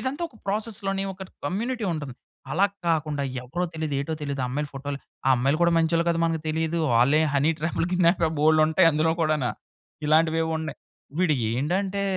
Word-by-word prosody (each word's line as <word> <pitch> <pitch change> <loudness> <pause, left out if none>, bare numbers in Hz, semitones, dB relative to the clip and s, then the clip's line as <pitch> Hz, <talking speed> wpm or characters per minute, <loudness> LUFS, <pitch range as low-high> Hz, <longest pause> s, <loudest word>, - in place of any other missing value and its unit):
ఇదంతా 270 +5 -3
ఒక 235 - -20
ప్రాసెస్‌ 215 +2 -2
లోనే 195 0 0
ఒక 190 - -9 0.2
కమ్యూనిటీ 230 - -2
ఉంటది. 145 -5 -5 0.4
అలా 180 +8 +3 0.2
కాకుండా 155 -3 0 0.2
ఎవరో 175 +8 -2
తెలియదు? 155 -2 -3
ఏటో 140 +3 -3
తెలీదు? 140 -2 -3
ఆ - - -1
అమ్మాయిల 145 +3 -2
ఫోటోలు, 140 +1 -4 0.3
ఆ - - +5
అమ్మాయిలు 135 +5 +1
కూడా 170 0 +4
మంచోళ్ళొ 165 +1 +2
కాదో 170 0 +1
మనకు 165 -1 -1
తెలీదు. 160 +1 -1 0.2
వాళ్ళే 135 +7 +4
హనీ 140 +3 +3
ట్రాప్‌లు‌, 165 +1 -1
కిడ్నాప్ 175 -1 +3 0.2
బోలేడుంటాయి 155 +3 +5
అందులో 155 +2 +2
కూడాన. 155 -4 +1 0.6
ఇలాంటివేవో 160 +1 +3
ఉన్నాయి. 155 -1 -6 0.4
వీడు 175 -4 +3 0.2
ఏండంటే 190 +10 -1
160 Hz, 170 wpm, -25 LUFS, 150-180 Hz, 0.6 s, ఆ